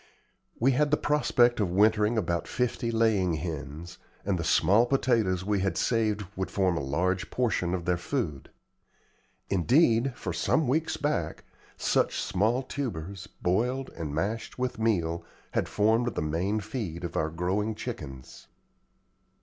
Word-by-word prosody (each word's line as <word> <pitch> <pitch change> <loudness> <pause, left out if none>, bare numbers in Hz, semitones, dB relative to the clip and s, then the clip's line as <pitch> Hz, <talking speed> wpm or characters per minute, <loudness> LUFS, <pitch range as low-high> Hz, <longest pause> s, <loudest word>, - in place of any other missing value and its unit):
We 130 +4 +4
had 145 +3 +2
the 150 - +3
prospect 125 -5 +3
of 100 -4 +1
wintering 105 +4 +3
about 85 -5 -1
fifty 120 -1 -1
laying 110 -7 +2
hens; 80 +1 -6 0.3
and 95 -3 0
the - - -1
small 110 +8 +4
potatoes 115 -9 +1
we 105 -1 +1
had 95 -3 -1
saved 110 -3 +1
would 95 0 -2
form 95 -3 +1
a - - -1
large 90 +7 -1
portion 95 -8 0
of 85 -2 -5
their 90 -1 +1
food. 90 - -3 1.0
Indeed, 115 - +3
for 90 - -4
some 125 - +1
weeks 155 +6 0
back, 150 0 -2 0.3
such - - +1
small 110 +7 +1
tubers, 100 - -5 0.2
boiled 125 +9 0
and 80 -3 -5
mashed 100 +10 -3
with 125 -2 -2
meal, 85 -7 0 0.3
had - - -1
formed 110 +2 +2
the - - -1
main 90 +8 0
feed 100 -6 -5
of 85 - -5
our 80 - +1
growing 95 +6 -1
chickens. 70 - -8
105 Hz, 145 wpm, -28 LUFS, 85-120 Hz, 1.0 s, We